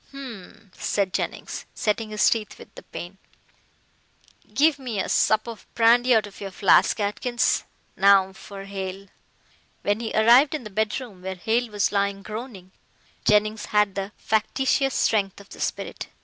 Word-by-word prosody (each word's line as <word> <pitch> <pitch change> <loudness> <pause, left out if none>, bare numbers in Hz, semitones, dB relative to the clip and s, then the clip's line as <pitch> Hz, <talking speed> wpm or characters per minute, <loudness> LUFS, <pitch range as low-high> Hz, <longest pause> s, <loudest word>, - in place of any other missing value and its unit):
"Humph!" 230 -7 -11
said 195 -3 0
Jennings, - - -4
setting 215 +1 -1
his 210 0 +2
teeth 220 -3 0
with - - -14
the - - -11
pain, 180 +3 -9 1.3
"give 295 0 +3
me 240 -6 -4
a - - -1
sup 215 0 +2
of 230 -2 -9
brandy 240 +2 +5
out 220 - +3
of 205 0 -13
your 200 - -4
flask, 190 +3 +3
Atkins. 235 +4 0 0.3
Now 195 -1 +5
for 195 0 -10
Hale." 195 0 -6 0.7
When 205 +1 +1
he 230 -1 -4
arrived 240 +7 +5
in 300 - -5
the 210 - -9
bedroom 215 -1 -3
where 190 +1 -5
Hale 225 +6 0
was 205 -1 0
lying 200 -1 -1
groaning, 215 -4 -8 0.5
Jennings 210 +1 +2
had 210 -2 +2
the 195 +1 -4
factitious 265 +5 0
strength 200 -3 +1
of 200 - -15
the - - -12
spirit. - - -4
210 Hz, 155 wpm, -24 LUFS, 195-235 Hz, 1.3 s, brandy